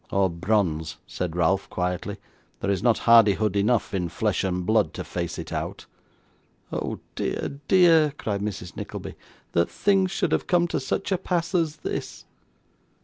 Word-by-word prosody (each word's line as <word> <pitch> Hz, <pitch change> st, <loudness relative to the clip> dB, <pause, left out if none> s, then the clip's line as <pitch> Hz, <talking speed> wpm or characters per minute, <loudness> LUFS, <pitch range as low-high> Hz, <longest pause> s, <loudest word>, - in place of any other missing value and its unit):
'Or 95 Hz, -2 st, +2 dB
bronze,' 85 Hz, -3 st, 0 dB
said 85 Hz, -2 st, -4 dB
Ralph, 90 Hz, +3 st, +1 dB
quietly; 90 Hz, +3 st, -2 dB, 0.4 s
'there 100 Hz, -, 0 dB
is 95 Hz, -2 st, 0 dB
not 120 Hz, -1 st, +3 dB
hardihood 110 Hz, -3 st, +5 dB
enough 105 Hz, +2 st, +1 dB
in 90 Hz, -3 st, -1 dB
flesh 105 Hz, +4 st, 0 dB
and 90 Hz, -1 st, -1 dB
blood 105 Hz, -6 st, +2 dB
to -, -, -4 dB
face 85 Hz, -1 st, -4 dB
it -, -, -6 dB
out.' -, -, -4 dB, 0.9 s
'Oh -, -, -3 dB, 0.2 s
dear, 140 Hz, -, -3 dB
dear!' 165 Hz, -5 st, +6 dB
cried 100 Hz, -2 st, -2 dB
Mrs. 100 Hz, -4 st, -5 dB
Nickleby, -, -, -6 dB, 0.4 s
'that 85 Hz, 0 st, +2 dB
things 195 Hz, -2 st, +2 dB
should 185 Hz, -3 st, -1 dB
have -, -, 0 dB
come 175 Hz, -1 st, +3 dB
to -, -, 0 dB
such 195 Hz, +9 st, -2 dB
a 190 Hz, -, +2 dB
pass 175 Hz, -1 st, -1 dB
as 165 Hz, -4 st, +1 dB
this! -, -, -5 dB
105 Hz, 160 wpm, -25 LUFS, -, 0.9 s, dear